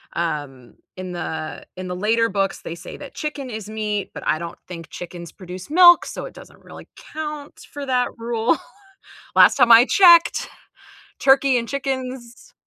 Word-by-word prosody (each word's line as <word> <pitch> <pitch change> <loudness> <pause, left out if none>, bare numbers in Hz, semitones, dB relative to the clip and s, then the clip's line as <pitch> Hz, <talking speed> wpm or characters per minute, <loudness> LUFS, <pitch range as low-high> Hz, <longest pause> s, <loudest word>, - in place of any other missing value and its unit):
um, 145 -7 -4 0.2
in 185 -1 -7
the 160 -2 -6
in 185 0 -7
the 180 - -4
later 225 +4 +1
books 195 0 -2
they 165 - -7
say - - -10
that 285 - -11
chicken 295 -3 -5
is 215 -3 -7
meat, 210 -2 -4
but - - -8
I - - +2
don't 170 +1 -8
think 165 -3 -9
chickens 175 -1 -9
produce 185 +5 -10
milk, 350 +1 +7
so - - -7
it - - -10
doesn't - - -15
really - - -13 0.2
count 300 -2 -7
for 285 -1 -7
that 250 -1 +1
rule. 230 +3 0 0.8
Last - - +6
time 245 -3 +4
I 230 +1 +9
checked 340 +2 +5 0.7
turkey 270 -1 +4
and 235 -1 -4
chickens 260 - -5
230 Hz, 165 wpm, -21 LUFS, 180-275 Hz, 0.8 s, I